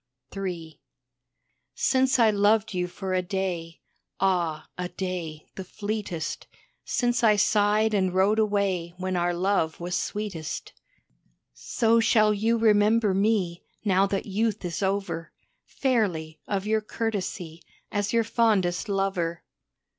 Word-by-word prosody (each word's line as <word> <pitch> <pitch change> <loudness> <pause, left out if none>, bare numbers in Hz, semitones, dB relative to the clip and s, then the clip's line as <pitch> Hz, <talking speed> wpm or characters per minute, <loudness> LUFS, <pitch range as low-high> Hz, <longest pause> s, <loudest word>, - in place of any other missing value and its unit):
III 175 -5 -5 0.9
Since 260 0 +2
I 225 -3 +5
loved 210 +1 +2
you 180 -1 -1
for 190 +1 -5
a 185 - +2
day 180 -3 -3 0.4
Ah, 170 -5 0
a 180 0 -4
day, 175 -5 -5
the 190 - -6
fleetest 205 -4 -4 0.4
Since 245 -1 0
I 215 -2 +6
sighed 210 +1 +3
and 190 -3 +2
rode 195 +4 +3
away 195 -5 0
when 185 0 -2
our 175 0 +1
love 175 -2 0
was 175 +1 -3
sweetest, 185 -3 -4 0.8
So 220 - +1
shall 215 -2 +4
you 225 +3 +1
remember 215 -1 +4
me, 195 -4 +1 0.2
now 195 0 +3
that 195 0 -2
youth 210 0 -1
is 175 +1 -3
over, 190 -4 -2 0.3
Fairly, 190 - -1
of 200 -1 -2
your 220 0 +1
courtesy, 195 -7 -4 0.3
as 205 0 -1
your 230 -1 +3
fondest 215 -5 +1
lover. 190 -4 -1
195 Hz, 125 wpm, -26 LUFS, 175-215 Hz, 0.9 s, I